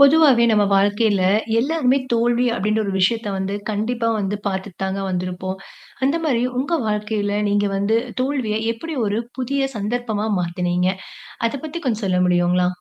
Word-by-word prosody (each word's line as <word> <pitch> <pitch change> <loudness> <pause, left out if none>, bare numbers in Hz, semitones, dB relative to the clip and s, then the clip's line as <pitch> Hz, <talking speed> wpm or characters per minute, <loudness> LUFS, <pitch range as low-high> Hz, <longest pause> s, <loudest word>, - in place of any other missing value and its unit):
பொதுவாவே 280 -4 +6
நம்ம 210 -2 +4
வாழ்க்கையில 205 0 +2 0.4
எல்லாருமே 275 -1 +2
தோல்வி 235 +1 +2
அப்பிடின்ற 215 0 0
ஒரு 200 - -2
விஷயத்த 215 +4 +1
வந்து 190 +1 -2 0.2
கண்டிப்பா 230 +3 -1
வந்து 205 0 -1
பார்த்துத்தாங்க 190 0 -3
வந்திருப்போம். 185 +1 -3 0.5
அந்த 280 +4 +2
மாதிரி 245 -6 +1 0.2
உங்க 290 +6 -2
வாழ்க்கையில 210 -1 -1
நீங்க 205 0 +2
வந்து 200 +3 +1 0.3
தோல்விய 255 -6 -1 0.2
எப்பிடி 315 +7 -6
ஒரு 205 +2 0 0.2
புதிய 275 +2 -1
சந்தர்ப்பமா 220 0 -2
மாத்துனீங்க? 180 +1 0 0.6
அதப் 270 +4 -5
பத்தி 315 +2 -5
கொஞ்சம் 225 -4 -1
சொல்ல 185 -1 +1
முடியுங்களா? 180 0 +2
210 Hz, 140 wpm, -21 LUFS, 195-245 Hz, 0.6 s, பொதுவாவே